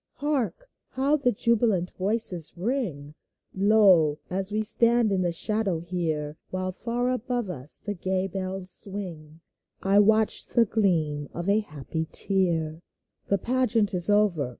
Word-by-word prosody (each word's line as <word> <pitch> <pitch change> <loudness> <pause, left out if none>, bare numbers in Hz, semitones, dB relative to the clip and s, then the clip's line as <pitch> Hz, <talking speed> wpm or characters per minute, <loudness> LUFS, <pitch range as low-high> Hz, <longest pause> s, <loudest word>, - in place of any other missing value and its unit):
Hark! 285 -6 -1 0.4
how 275 +3 +2
the 260 -4 +2
jubilant 210 -5 +1
voices 190 -4 0
ring! 175 - -3 0.4
Lo! 190 -7 +4
as 190 +2 -1
we 215 +1 0
stand 230 0 +3
in 190 -1 +1
the 175 -1 0
shadow 195 -1 -1
here. 160 -4 -3
While 185 0 -3
far 240 +5 -2
above 245 -4 -2
us 140 -3 -2
the 205 - -5
gay 185 0 -2
bells 190 0 -5
swing, 170 -6 -7 0.4
I 195 +1 +5
catch 220 +1 +3
the 235 - +3
gleam 160 -9 0
of 175 +2 -4
a 205 +2 +4
happy 160 -3 -5
tear! 170 -5 0 0.5
The 200 - +2
pageant 235 -2 +1
is 180 +1 +1
over. 200 -10 +2
195 Hz, 140 wpm, -26 LUFS, 170-220 Hz, 0.5 s, I